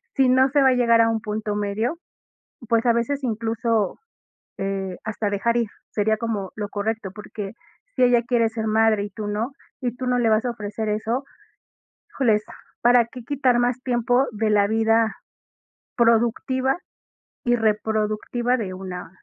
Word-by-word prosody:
si 265 -2 +4
no 260 +1 +5
se 285 +1 +3
va 265 - +6
a - - +4
llegar 235 -2 +4
a 225 - +4
un 225 -1 -1
punto 210 0 -3
medio, 210 +8 -1 0.7
pues 230 0 +2
a 235 - +6
veces 275 +5 -1
incluso, 225 -3 -1 0.6
eh, 195 -1 -3
hasta 215 -1 -2
dejar 230 +4 0
ir, 235 -2 +1 0.2
sería 220 +1 +1
como 215 -4 -3
lo 210 -1 -3
correcto, 210 0 -3
porque 210 -1 -7 0.4
si - - 0
ella 245 -1 +5
quiere 240 -2 +2
ser 220 0 -4
madre 220 -1 +3
y 205 - -6
tú 210 +1 -6
no, 220 +6 -2 0.3
y 245 -2 -2
tú 255 - -5
no 250 0 +2
le 235 -2 +2
vas 220 +1 +3
a 245 - 0
ofrecer 215 -1 -4
eso, 225 +5 -1 0.9
híjoles, 220 -6 +2 0.4
¿para 240 -1 +5
qué 250 +1 -10
quitar 255 -2 +2
más 245 +1 +1
tiempo 245 +1 +2
de 215 0 0
la 205 -1 +4
vida 225 0 +2 0.8
productiva, 240 +3 +2 0.7
y 240 - +3
reproductiva 220 +2 0
de 200 -6 -4
una 185 -2 -7
225 Hz, 165 wpm, -23 LUFS, 210-245 Hz, 0.9 s, va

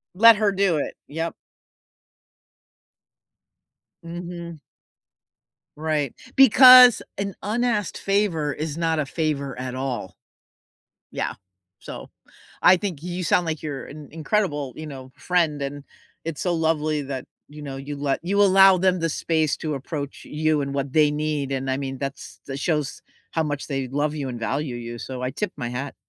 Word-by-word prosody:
Let 230 +2 +8
her 210 -2 +2
do 195 -4 +2
it, - - -3
yep. 165 +3 -4 2.7
Mhm. 170 -1 -7 1.2
Right, 150 -3 -1 0.2
because 255 -1 +9 0.2
an 200 -1 -3
unasked 215 -2 -1
favor 195 -7 0
is 155 0 -4
not 165 -2 0
a 145 - 0
favor 140 -4 -2
at 125 0 -4
all. 130 -7 -4 1.0
Yeah, - - -2 0.5
so - - -9 0.5
I 185 - +7
think 175 -6 -5
you 180 +1 -4
sound 175 +2 +2
like 160 -2 -3
you're 145 -4 -5
an 150 -1 -10
incredible, 155 - -1
you 155 0 -7
know, 130 -2 -9
friend, 165 -5 0
and 140 0 -5 0.4
it's 165 -3 -5
so 180 - 0
lovely 155 -2 0
that, 135 -2 -5 0.2
you 150 0 -11
know, 140 -2 -6
you 140 +2 -6
let 140 -1 -1
you 200 +3 +2
allow 195 -1 +7
them 185 0 +2
the 165 0 0
space 155 -1 0
to 155 -2 -3
approach 140 +1 -5
you 155 -1 0
and 140 0 -3
what 140 -1 -3
they 150 -2 +4
need, 150 -2 -2
and 135 0 -2
I 130 - 0
mean 135 -1 -4
that's 140 +1 -6
that 135 0 -5
shows 150 -3 -1 0.3
how 160 - 0
much 145 -2 -3
they 135 -3 -2
love 145 +2 -1
you 140 -3 -3
and 120 -2 -6
value 135 +3 -2
you, 120 0 -7
so 130 -1 -6
I 130 - -1
tip 195 +8 -3
my 120 - -3
hat. 130 +3 -5
150 Hz, 160 wpm, -23 LUFS, 140-175 Hz, 2.7 s, because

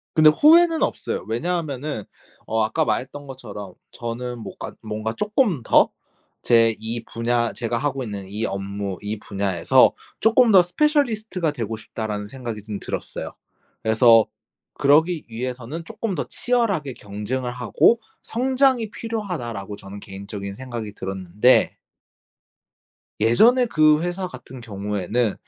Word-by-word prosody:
근데 155 -1 +7
후회는 325 - +5
없어요. - - -2
왜냐하면은 145 - -2 0.4
어 110 0 +1
아까 155 +9 +1
말했던 140 +2 -3
것처럼 105 -8 -9 0.2
저는 120 +1 -5
뭐가 - - -7
뭔가 110 +1 -3
쪼끔 210 - +1
더 - - +5 0.5
'제 115 -1 +4
이 115 +1 -3
분야 115 0 0
제가 115 0 -2
하고 135 -1 -2
있는 100 -4 -6
이 105 +3 -3
업무 100 -1 -4
이 105 +1 -4
분야에서 100 -5 +3 0.3
쪼끔 225 +1 +5
더 190 - +9
스페셜리스트가 220 - +1
되고 115 -5 -4
싶다.'라는 105 -1 -5
생각이 115 -3 -6
좀 105 -2 -5
들었어요. - - -4 0.5
그래서 115 0 +6 0.5
'그러기 155 +4 +3
위해서는 125 +6 -5
쪼끔 205 +3 -4
더 145 - -2
치열하게 210 - 0
경쟁을 105 +5 -4
하고 125 - +3 0.2
성장이 255 -2 +1
필요하다.'라고 155 - -5
저는 100 +1 -10
개인적인 100 0 -7
생각이 120 -4 -6
들었는데 95 +5 +2 1.5
예전에 235 - +5
그 155 -5 +4
회사 175 +1 -2
같은 130 0 -11
경우에는 105 +1 -1
120 Hz, 305 characters per minute, -23 LUFS, 105-170 Hz, 1.5 s, 더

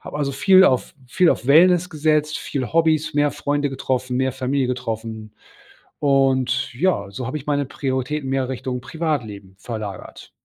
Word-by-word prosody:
Habe 150 - -7
also 140 -1 -1
viel 190 +7 +5
auf 130 -8 +1
viel 175 +4 +3
auf 125 - -2
Wellness 175 +4 +5
gesetzt, 155 -1 0
viel 135 -1 -4
Hobbys, 160 -2 +2
mehr 145 0 +2
Freunde 145 0 -1
getroffen, 130 -1 -2
mehr 130 -1 0
Familie 130 0 -1
getroffen. 110 -3 -5 0.7
Und 130 -3 +1
ja, 125 - 0
so 115 +5 -6
habe 130 +5 -3
ich 145 - -14
meine 145 -1 0
Prioritäten 135 +1 -3
mehr 135 -1 0
Richtung 130 -1 -4
Privatleben 120 - -4
verlagert. 110 -2 -8
135 Hz, 155 wpm, -21 LUFS, 125-150 Hz, 0.7 s, viel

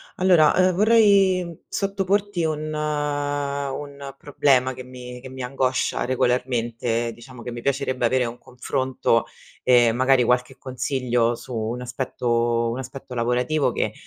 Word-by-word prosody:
Allora, 175 -5 +4
ehm, 185 0 +4
vorrei 195 -5 +3
sottoporti 195 -1 -1
un 155 0 -2
un 145 -2 -3
problema, 135 -3 +2
che 130 0 -9
mi 125 -1 -10
che 130 - -9
mi 130 0 -8
angoscia 130 0 -1
regolarmente, 120 -2 0
diciamo 120 +1 -12
che 125 - -5
mi 120 0 -7
piacerebbe 130 -1 -1
avere 125 +1 +2
un 120 +1 -6
confronto, 125 -2 -1 0.4
e 120 -2 +5
magari 130 +2 +3
qualche 125 +2 0
consiglio, 125 -2 -1
su 120 +2 -10
un 115 +2 -3
aspetto 120 -2 -1
un 120 - -4
aspetto 130 0 -8
lavorativo 125 +5 +1
che, - - -2
130 Hz, 130 wpm, -23 LUFS, 125-145 Hz, 0.4 s, e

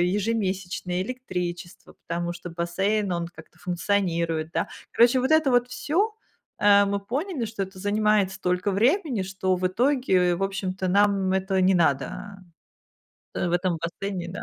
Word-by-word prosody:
ежемесячные, 190 -4 -1
электричество, 180 -8 -6
потому 175 0 -2
что 175 0 -8
бассейн, 195 +4 0
он 170 -1 -2
как-то 160 -2 -15
функционирует, 170 -3 -1
да. - - 0 0.3
Короче, 240 +3 +5
вот 260 +4 0
это 315 -3 +4
вот 245 0 +3
всё. 295 +5 -3 0.7
Э, 200 0 +6
мы 200 0 0
поняли, 270 - -3
что 210 -2 -3
это 190 0 -10
занимает 205 -1 +2
столько 180 0 -1
времени, 250 - +1
что 190 0 -1
в 185 0 -2
итоге, 190 -5 +2
в 180 - -7
общем-то, 190 -1 -2
нам 200 -1 +3
это 190 0 0
не 190 +1 +4
надо, 140 -6 +2 1.3
в 175 -1 -1
этом 180 -1 +1
бассейне, 175 +2 -4
да. 180 - -6
190 Hz, 145 wpm, -25 LUFS, 180-210 Hz, 1.3 s, Э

